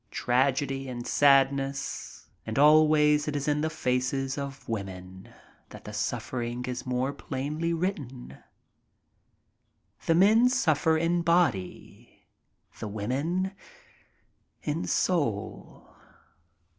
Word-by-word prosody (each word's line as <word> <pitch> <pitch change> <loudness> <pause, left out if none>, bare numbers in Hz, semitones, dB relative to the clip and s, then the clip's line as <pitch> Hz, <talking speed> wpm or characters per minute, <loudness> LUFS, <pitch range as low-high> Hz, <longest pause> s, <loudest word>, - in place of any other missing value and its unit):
Tragedy 135 +3 0
and 120 -1 -6
sadness, 140 -1 +1 0.2
and 110 - -5
always 150 0 +5
it 150 - -2
is 145 0 -2
in 150 0 +1
the 160 - 0
faces 135 -2 -1
of 140 -1 -6
the - - -6
women 95 -3 -7 0.4
that - - -12
the - - -9
suffering 120 0 -3
is 125 0 -5
more 125 +2 -1
plainly 150 +6 -3
written. 145 - -4 1.7
The 165 - +4
men 220 +7 +5
suffer 160 - +2
in 170 +2 +1
body 165 - -1 0.2
— - - -28
the - - -4
women 140 - -2 1.1
in 155 +3 -2
soul. 115 - -2
140 Hz, 105 wpm, -27 LUFS, 125-160 Hz, 1.7 s, always